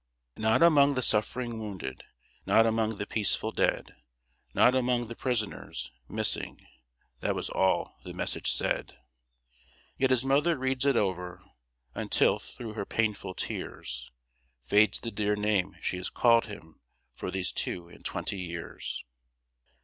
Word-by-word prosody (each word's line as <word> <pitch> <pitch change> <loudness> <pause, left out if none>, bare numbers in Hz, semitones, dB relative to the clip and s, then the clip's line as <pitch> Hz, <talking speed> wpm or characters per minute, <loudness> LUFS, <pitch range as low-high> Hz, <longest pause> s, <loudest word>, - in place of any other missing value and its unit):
"Not 110 +8 +3
among 145 -4 +6
the 130 - 0
suffering 115 +2 +1
wounded; 95 -12 -6 0.4
Not 115 - +6
among 110 -1 +1
the 100 - -3
peaceful 105 -2 +1
dead; - - 0 0.6
Not 125 - +5
among 125 -2 +1
the 115 +1 -8
prisoners. 115 -5 -3 0.2
MISSING - - -3 0.5
That - - 0
was - - -3
all 95 0 +1
the - - -7
message - - 0
said. - - -1 1.0
"Yet 130 - +3
his 130 0 +2
mother 145 +5 +3
reads 130 +1 0
it 135 -4 +4
over, 90 -2 -1 0.5
Until, - - +2
through 115 -3 -8
her 105 - -3
painful 105 -4 -1
tears, - - -5 0.5
Fades 105 +11 +4
the 115 - -4
dear 105 -1 0
name 105 -3 0
she - - -1
has 90 - -3
called 115 -1 +4
him 80 -7 -11 0.3
For - - -5
these 95 0 -1
two 85 -1 -3
and 85 - -16
twenty 100 - -3
years." 85 -2 -5
110 Hz, 140 wpm, -29 LUFS, 95-125 Hz, 1.0 s, among